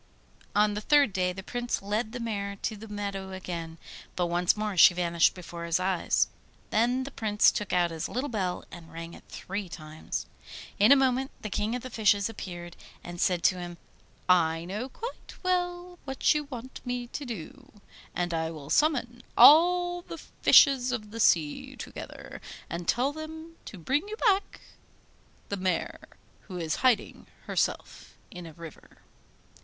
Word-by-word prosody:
On 210 0 +4
the 210 - -3
third 285 -3 +4
day 180 -1 +1
the 190 +1 -8
Prince 245 +3 -2
led 215 +3 -2
the 245 - -5
mare 200 -4 -3
to 220 - -1
the 215 +2 -10
meadow 200 -2 -5
again; 170 -3 -6 0.4
but 180 - +1
once 175 +3 +2
more 210 -2 -2
she 175 0 +8
vanished 170 -1 +2
before 170 -1 -8
his 170 +1 +1
eyes. 185 -1 +1 0.4
Then 245 +4 +2
the 275 - -7
Prince 210 -4 +3
took 210 - -4
out 175 -1 +2
his 160 -1 -4
little 255 +4 -2
bell 190 -8 -2
and 170 -2 -11
rang 165 +1 -7
it - - -14
three 195 0 -5
times. 155 -2 -6 0.5
In 210 +6 +6
a - - +10
moment 265 0 +2
the 215 - -4
King 210 +4 -1
of 250 - -5
the 255 - -7
Fishes 210 -2 +2
appeared, 175 -5 -8 0.3
and 175 0 -6
said 180 -2 +1
to 185 -2 +3
him: 175 -1 -7 0.5
'I 165 -2 +3
know 210 +8 -4
quite 465 - -8
well 355 -1 -1
what 270 -1 +2
you 300 -1 -1
want 260 -2 -9
me 245 0 -3
to 265 +4 -6
do, 250 - -8 0.4
and 175 -1 -1
I 160 -1 -1
will 150 -3 -9
summon 245 -6 +1 0.2
all 350 +3 +7
the 335 - -9
fishes 265 -5 +5
of 215 -4 -4
the 230 - -7
sea 160 -8 +2
together, - - -9 0.3
and 170 0 -4
tell 260 +4 +2
them 320 +1 -8
to 200 - -9
bring 275 - 0
you 425 - -5
back 405 -4 +1 0.9
the 200 - -2
mare, 185 -2 -1 0.5
who 185 -3 -6
is 160 -2 -2
hiding 250 -5 +1 0.2
herself - - -2
in 180 -2 -8
a 160 - -11
river. 165 -1 -13
210 Hz, 170 wpm, -28 LUFS, 175-260 Hz, 0.9 s, a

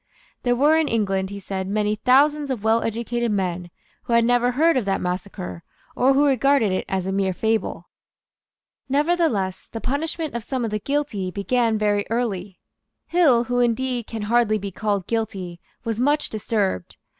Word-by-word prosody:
There 245 -1 +1
were 295 +5 +4
in 320 -2 +2
England, 195 -4 0
he 200 0 -7
said, 190 -1 -4
many 210 +1 0
thousands 285 +5 +3
of 245 -6 -3
well 225 +1 +3
educated 235 +1 -2
men 180 -3 -2 0.4
who 235 - -2
had 235 0 +5
never 245 +1 +2
heard 325 +5 +3
of 255 -5 0
that 195 -1 0
massacre, 180 -1 -4 0.3
or 265 +2 +4
who 285 +2 +4
regarded 275 -5 +3
it 185 - -1
as 190 -1 -1
a 190 - -2
mere 190 -1 0
fable. 220 -5 -1 1.0
Nevertheless 280 - +1
the 225 - -5
punishment 310 +5 -2
of 235 -1 -4
some 255 0 -2
of 220 - -3
the 210 - -1
guilty 275 -8 -2
began 225 +4 0
very 205 -1 +1
early. 205 -5 -2 0.5
Hill, 290 -10 +4
who 245 0 -1
indeed 245 0 0
can 225 -2 -5
hardly 220 0 +2
be 200 -1 -5
called 200 -1 -1
guilty, 195 -6 -3 0.2
was 225 -1 -3
much 290 +4 +1
disturbed. 205 - -2
225 Hz, 170 wpm, -23 LUFS, 200-255 Hz, 1.0 s, had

